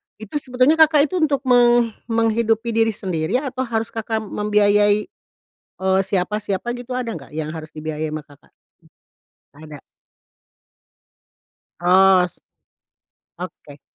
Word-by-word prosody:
itu 220 Hz, +4 st, -11 dB
sebetulnya 255 Hz, +4 st, +2 dB
Kakak 305 Hz, -2 st, +5 dB
itu -, -, -2 dB
untuk 290 Hz, -4 st, +1 dB
meng 240 Hz, -2 st, +4 dB, 0.2 s
menghidupi 225 Hz, 0 st, +1 dB
diri 225 Hz, -1 st, +2 dB
sendiri, 165 Hz, -1 st, -2 dB
atau 260 Hz, -2 st, -3 dB
harus 225 Hz, -1 st, -2 dB
Kakak 220 Hz, 0 st, -3 dB
membiayai, 205 Hz, 0 st, +2 dB, 0.9 s
eee, 190 Hz, 0 st, +3 dB
siapa-siapa 200 Hz, +3 st, -2 dB
gitu 245 Hz, +1 st, -7 dB
ada 250 Hz, -2 st, -3 dB
nggak, 160 Hz, -11 st, -8 dB
yang 155 Hz, -1 st, -3 dB
harus 160 Hz, -1 st, -8 dB
dibiayai 155 Hz, 0 st, -4 dB
sama 155 Hz, -, -4 dB
Kakak? 145 Hz, -1 st, -22 dB, 1.0 s
Mmm, 155 Hz, -, -14 dB
ada? 145 Hz, -, -9 dB, 2.0 s
Os 185 Hz, 0 st, +4 dB, 1.0 s
oke. 155 Hz, -5 st, -10 dB
215 Hz, 115 wpm, -21 LUFS, 180-240 Hz, 2.0 s, Kakak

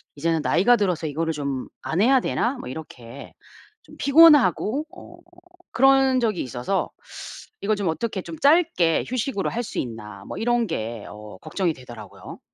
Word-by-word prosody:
이제는 165 Hz, +2 st, 0 dB
나이가 245 Hz, +6 st, +4 dB
들어서 180 Hz, -6 st, -1 dB
이거를 160 Hz, +2 st, -2 dB
좀 140 Hz, -3 st, -4 dB
안 170 Hz, +5 st, -1 dB
해야 260 Hz, +3 st, +5 dB
되나?' 255 Hz, +3 st, -1 dB
뭐 -, -, -7 dB
이렇게 130 Hz, -3 st, -10 dB, 0.5 s
좀 -, -, -16 dB
피곤하고 295 Hz, -3 st, +5 dB
어 345 Hz, -1 st, -13 dB, 0.6 s
그런 270 Hz, 0 st, +4 dB
적이 215 Hz, -6 st, 0 dB
있어서 125 Hz, +10 st, -2 dB, 0.7 s
이걸 215 Hz, +1 st, +1 dB
좀 200 Hz, -3 st, -2 dB
어떻게 195 Hz, +3 st, -3 dB
'좀 165 Hz, -1 st, -8 dB
짧게 285 Hz, -, +3 dB
휴식으로 250 Hz, -4 st, -2 dB
할 240 Hz, -, -3 dB
수 -, -, -5 dB
있나?' 105 Hz, -5 st, -7 dB
뭐 -, -, -7 dB
이런 240 Hz, 0 st, +1 dB
게 115 Hz, -, -5 dB
어 105 Hz, -2 st, -11 dB
걱정이 180 Hz, -5 st, -2 dB
되더라고요. 110 Hz, -7 st, -12 dB
180 Hz, 310 characters per minute, -23 LUFS, -, 0.7 s, 해야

